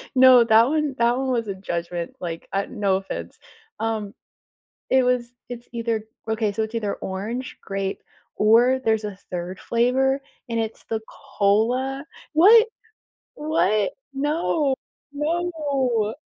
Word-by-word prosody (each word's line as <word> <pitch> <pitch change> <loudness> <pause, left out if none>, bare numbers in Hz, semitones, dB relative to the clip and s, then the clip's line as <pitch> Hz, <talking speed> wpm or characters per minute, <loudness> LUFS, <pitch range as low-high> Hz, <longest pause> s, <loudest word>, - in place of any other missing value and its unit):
No, 255 -2 +8
that 225 +1 +5
one 300 -2 0
that 235 +1 +3
one 265 -1 -1
was 230 -3 0
a 195 - -3
judgment. 170 -2 -4
Like, 165 -2 -6
uh, 195 0 0
no 200 -4 +1
offense. 195 - -7 0.4
Um, 220 -2 -2 0.8
it 260 -1 +4
was 250 -1 0 0.2
it's 240 0 -8
either 230 -2 -2 0.3
okay, 220 -2 0
so 220 +2 -1
it's 220 +2 -5
either 210 -3 -1
orange, 220 +7 -5
grape, 195 0 -3 0.3
or 240 +5 +4
there's 220 -1 +1
a 205 -2 -5 0.2
3rd 180 +1 -4
flavor, 265 +3 +1 0.3
and 230 0 -1
it's 225 0 -4
the 220 -1 -3
cola 255 +4 0 0.3
what? 440 +8 +7 0.7
What? 215 - +1 0.2
No. 290 0 0 0.4
No, 340 +5 -1
no. 255 -7 0
230 Hz, 135 wpm, -23 LUFS, 210-265 Hz, 0.8 s, No